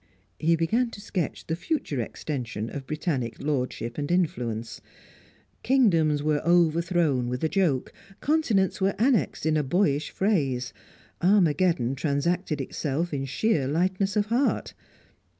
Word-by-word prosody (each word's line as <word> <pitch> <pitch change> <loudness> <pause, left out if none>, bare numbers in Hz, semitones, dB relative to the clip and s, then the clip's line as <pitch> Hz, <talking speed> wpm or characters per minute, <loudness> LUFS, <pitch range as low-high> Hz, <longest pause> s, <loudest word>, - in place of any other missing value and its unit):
He 165 +1 +3
began 220 +10 +1
to 205 - -10
sketch 185 -6 -3
the 160 - -2
future 170 - -2
extension 115 -4 -4
of 135 -2 -7
Britannic 150 -6 -2
lordship 130 -3 -2
and 145 - -3
influence. 120 -11 -1 0.8
Kingdoms 165 - +3
were 150 -1 +1
overthrown 170 -5 +2
with 125 +3 -3
a - - +3
joke, 160 -8 0 0.3
continents 235 -13 +1
were 195 +1 +2
annexed 235 - +1
in 155 -1 +2
a 150 - +1
boyish 145 -1 +1
phrase; 140 - 0 0.5
Armageddon 170 - +3
transacted 145 +2 -1
itself 150 +4 -2
in 135 -1 -2
sheer 145 - 0
lightness 185 +6 0
of 210 -1 +2
heart. 240 +6 0
160 Hz, 130 wpm, -26 LUFS, 135-190 Hz, 0.8 s, He